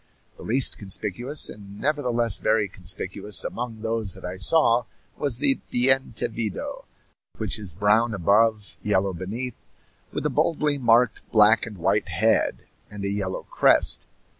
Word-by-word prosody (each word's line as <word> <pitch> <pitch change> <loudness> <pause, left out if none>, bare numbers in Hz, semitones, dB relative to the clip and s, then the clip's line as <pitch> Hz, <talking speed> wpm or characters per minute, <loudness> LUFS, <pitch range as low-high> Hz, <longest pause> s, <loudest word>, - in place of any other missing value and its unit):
The - - -15
least 130 +3 +1
conspicuous, 105 +8 0
and 100 0 -11
nevertheless 125 -7 +1
very 110 -2 +1
conspicuous, 95 +2 -1
among 115 -2 -5
those 110 -4 -2
that 95 - -10
I 90 +1 -5
saw 120 +2 +3 0.3
was 140 -5 -1
the 135 0 +1
bientevido, 120 -4 0 0.5
which - - -1
is 95 -7 -2
brown 105 +3 +2
above, 105 +3 +1
yellow 100 -2 0
beneath, 110 +8 -4 0.6
with - - -4
a - - +1
boldly 150 -3 0
marked 115 -1 +2
black 110 +1 +5
and 105 -3 -9
white 100 +4 0
head, 105 +7 +1 0.2
and 100 -1 -7
a - - 0
yellow 95 -2 -3
crest. - - +3
110 Hz, 140 wpm, -24 LUFS, 100-120 Hz, 0.6 s, black